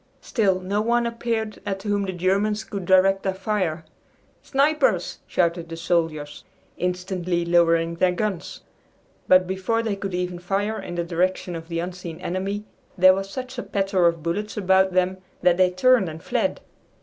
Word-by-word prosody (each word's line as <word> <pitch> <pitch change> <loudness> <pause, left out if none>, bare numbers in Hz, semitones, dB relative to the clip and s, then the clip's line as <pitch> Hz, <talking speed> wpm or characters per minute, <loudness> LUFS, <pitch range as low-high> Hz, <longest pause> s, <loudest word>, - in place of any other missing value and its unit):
Still 195 -6 +1
no 195 +3 -1
one 235 +2 +2
appeared 230 -2 -3
at 195 -1 -4
whom 205 -1 0
the - - -1
Germans 200 +4 0
could 200 -4 -6
direct 190 +1 +4
their 190 -1 -2
fire. 190 -5 -2 0.6
"Snipers!" 275 - +1
shouted 170 -1 0
the 165 - -6
soldiers, 160 -3 -1 0.3
instantly 180 -1 -2
lowering 170 -1 +3
their 180 +2 +2
guns, 185 0 -3 0.7
but 185 0 +6
before 190 +5 -1
they 220 -3 -1
could 195 -2 -4
even 180 -1 -3
fire 200 +4 -1
in 175 - -7
the 170 - -1
direction 180 +1 -1
of 165 0 -7
the 165 -1 -4
unseen 175 -1 -5
enemy, 190 +3 -3 0.3
there 185 +1 +7
was 195 +1 -3
such 255 +3 -6
a - - -1
patter 195 -4 +1
of 170 -2 -1
bullets 210 +7 -3
about 190 -1 +3
them 185 +1 +1 0.3
that 175 -1 +4
they 185 -1 +5
turned 195 +1 +3
and 160 +1 -9
fled. - - -1
185 Hz, 165 wpm, -24 LUFS, 175-205 Hz, 0.7 s, there